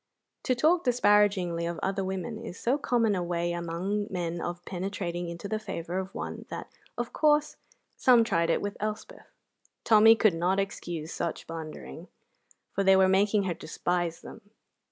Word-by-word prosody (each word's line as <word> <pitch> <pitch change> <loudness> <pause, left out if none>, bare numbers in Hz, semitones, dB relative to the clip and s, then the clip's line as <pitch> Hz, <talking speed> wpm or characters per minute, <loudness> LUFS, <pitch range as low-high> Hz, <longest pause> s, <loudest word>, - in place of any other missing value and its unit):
To 255 - +2
talk 330 +7 +3
disparagingly 205 -8 +3
of 170 - -4
other 195 0 -1
women 190 +4 -4
is 225 -6 -8
so 260 +5 +1
common 235 -6 +2
a 185 - -1
way 175 0 -1
among 175 +5 -2
men 175 -3 -3
of 175 0 -5
penetrating 175 -2 -4
into 170 +4 -6
the 215 +1 -2
favour 185 -4 -4
of 190 0 -6
one - - -5
that, - - -6 0.3
of 240 0 -3
course, 300 -1 +2 0.4
some 245 -3 +6
tried 170 -6 +1
it - - +1
with 205 0 -4
Elspeth. 215 - -5 0.6
Tommy 225 0 +7
could 215 -4 +3
not 180 +4 +1
excuse 175 -5 -4
such 170 - -3
blundering, 155 - -8 0.7
for 195 - 0
they 195 0 +6
were 190 0 +5
making 200 +2 +3
her 185 -2 -1
despise 170 0 -2
them. 205 - -12
190 Hz, 165 wpm, -28 LUFS, 170-215 Hz, 0.7 s, Tommy